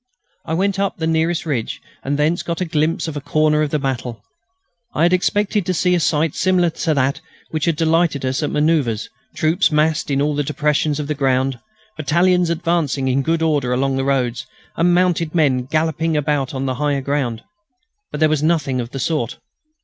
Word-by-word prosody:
I 160 - -2
went 195 +2 0
up 200 -1 -1
the 160 - -2
nearest 160 +1 0
ridge 130 -8 -2 0.2
and 140 +1 -1
thence 155 +4 +1
got 170 -1 -4
a 185 - 0
glimpse 160 +1 0
of 160 - -5
a 145 - -4
corner 155 +1 +2
of 155 - 0
the 150 - 0
battle. 130 -4 -4 0.7
I 155 - +2
had 175 +1 +4
expected 205 +3 +1
to 185 - 0
see 180 +2 +2
a 175 - +3
sight 155 -1 +1
similar 180 -2 +2
to 160 -1 -1
that 135 0 0 0.3
which 155 -2 -1
had 170 -2 +1
delighted 160 -3 +1
us 130 +3 -1
at 150 - -1
manoeuvres; 150 -8 0 0.2
troops 165 +3 +2
massed 155 +1 +1
in 140 -1 +1
all 150 +1 +1
the 145 - 0
depressions 150 +1 0
of 150 - -2
the 150 - -1
ground, 135 -2 0 0.4
battalions 175 +3 +2
advancing 165 -5 0
in 130 +2 +2
good 165 +3 0
order 145 -6 +1
along 135 +1 0
the 135 - -1
roads, 130 -3 -1 0.3
and 175 +1 +3
mounted 175 -3 +1
men 135 -6 +2
galloping 160 +2 0
about 145 -2 -1
on 135 0 -2
the 130 - -1
higher 145 -2 +1
ground. 130 -5 -2 0.7
But - - -6
there 155 - +6
was 155 -2 0
nothing 150 -5 +1
of 115 - -6
the 135 - -6
sort. 130 -6 -1
150 Hz, 200 wpm, -19 LUFS, 135-165 Hz, 0.7 s, there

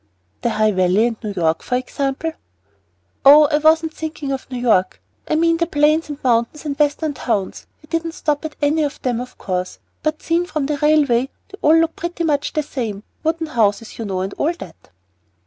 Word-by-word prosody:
"The - - +1
High 215 -1 +2
Valley 185 +3 +3
and 235 -2 -1
New 210 - -3
York, 165 -3 +1
for 250 - -2
example." 275 +4 -2 0.9
"Oh, 295 +2 +9
I 295 - +3
wasn't 320 +1 +3
thinking 305 -3 -5
of 270 -1 -4
New 255 - -5
York. 220 -7 +2 0.3
I - - +1
mean 330 +1 +3
the 335 0 0
plains 305 +1 +2
and 290 - -5
mountains 240 +5 +1
and 285 -2 -2
the 300 - +4
Western 295 +1 -3
towns. 220 -8 -3 0.2
We - - -17
didn't 330 0 -2
stop 295 -2 -1
at 315 -1 -6
any 300 +2 +2
of 290 -2 -2
them, 245 -2 0
of 250 - -9
course; 185 -1 -3 0.2
but 310 0 -2
seen 335 +2 +1
from 305 -5 -2
the 295 +1 -1
railway 280 -4 +3 0.2
they 400 - -12
all 310 +2 +5
look 330 0 +2
pretty 345 0 -4
much 290 -3 0
the 305 - 0
same, 225 -8 -4 0.2
wooden 325 +1 0
houses, 225 -6 0
you 225 - -3
know, 190 -2 -2
and 190 +1 -3
all 320 +4 +1
that." 180 - -12
290 Hz, 205 wpm, -20 LUFS, 230-315 Hz, 0.9 s, Oh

